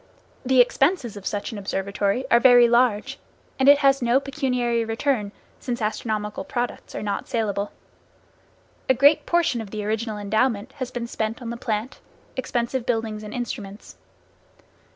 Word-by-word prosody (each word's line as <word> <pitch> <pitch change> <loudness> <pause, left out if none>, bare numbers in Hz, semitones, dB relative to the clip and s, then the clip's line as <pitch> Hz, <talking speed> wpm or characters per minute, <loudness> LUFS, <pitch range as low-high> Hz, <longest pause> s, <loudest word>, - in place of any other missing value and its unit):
The 260 -1 +5
expenses 270 - +1
of 200 -2 -7
such 205 -1 -3
an 215 - -6
observatory 200 +4 -1
are 235 - +7
very 245 -1 +7
large, 240 +2 +2 0.4
and 265 +1 +5
it 285 - +8
has 275 0 +4
no 240 +2 +3
pecuniary 250 -4 -1
return, 225 -1 -1 0.3
since 245 -1 -4
astronomical 215 -1 -2
products 245 -1 -4
are - - -4
not 205 -1 -3
salable. 205 -3 -2 1.2
A 260 - +5
great 285 +5 +4
portion 340 -9 +1
of 215 - -8
the 210 0 -5
original 220 0 -2
endowment 215 +3 0
has 255 -3 -4
been 240 -1 -4
spent 225 -1 -3
on 235 -2 -6
the - - -4
plant, 230 +1 -3 0.4
expensive 245 0 -2
buildings 225 -3 -2
and 210 -1 -8
instruments. 215 -4 -6
235 Hz, 150 wpm, -24 LUFS, 210-255 Hz, 1.2 s, it